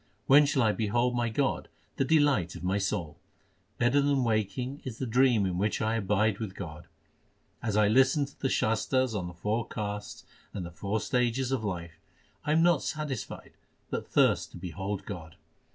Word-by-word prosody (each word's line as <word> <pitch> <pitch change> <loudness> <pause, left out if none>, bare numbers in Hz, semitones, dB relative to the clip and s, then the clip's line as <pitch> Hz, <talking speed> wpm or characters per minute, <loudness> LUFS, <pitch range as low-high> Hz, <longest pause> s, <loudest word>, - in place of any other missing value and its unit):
When 145 +2 +7
shall 135 -3 +2
I 110 - +4
behold 120 +4 0
my 120 -1 +1
God 135 +4 -1 0.3
the - - +2
delight 140 - +2
of 85 - -9
my 95 +3 +1
soul? 95 -6 -3 0.6
Better 120 +4 +3
than 140 -2 +2
waking 115 +4 -1
is 120 -4 -6
the 130 - -3
dream 120 -3 +3
in 90 -1 -1
which 105 +2 0
I 110 0 0
abide 105 0 +1
with 105 -4 -5
God. 80 -5 -8 0.7
As 105 -2 -1
I 105 -1 +5
listen 135 +6 +4
to 140 - -16
the 135 - 0
Shastars 125 +2 +1
on 95 -4 -2
the 90 - -9
four 105 +6 -1
castes 105 -1 -5 0.3
and 95 -4 -3
the 85 - -8
four 100 +6 -2
stages 125 0 0
of 130 -4 0
life, 85 -5 -5 0.4
I 150 - -1
am 160 +2 +4
not 175 -4 +4
satisfied 150 -7 -5 0.4
but - - -3
thirst - - +3
to - - -8
behold 95 +3 -5
God. 85 -5 -8
110 Hz, 185 wpm, -29 LUFS, 100-130 Hz, 0.7 s, When